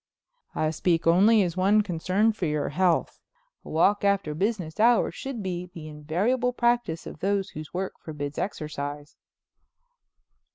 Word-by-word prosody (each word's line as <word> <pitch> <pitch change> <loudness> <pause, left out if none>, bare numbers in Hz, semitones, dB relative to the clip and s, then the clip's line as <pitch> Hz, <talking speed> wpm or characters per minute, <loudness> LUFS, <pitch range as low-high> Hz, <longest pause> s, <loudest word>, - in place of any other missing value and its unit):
"I 155 0 0
speak 165 +1 0
only 200 +6 +5
as 175 -2 -2
one 200 +3 +3
concerned 195 +4 +1
for 185 -6 -2
your 150 -1 -1
health. 175 +2 +1 0.4
A - - -11
walk 195 +6 +2
after 200 -6 +1
business 190 0 -2
hours 235 +2 +4
should 265 -6 -6
be 180 -1 -4
the 155 -2 -8
invariable 190 +13 -1
practice 240 -9 0
of - - -9
those 200 +1 -1
whose 155 0 -8
work 190 +1 -3
forbids 145 -2 -6
exercise." 145 -5 -5
185 Hz, 140 wpm, -26 LUFS, 155-210 Hz, 0.4 s, only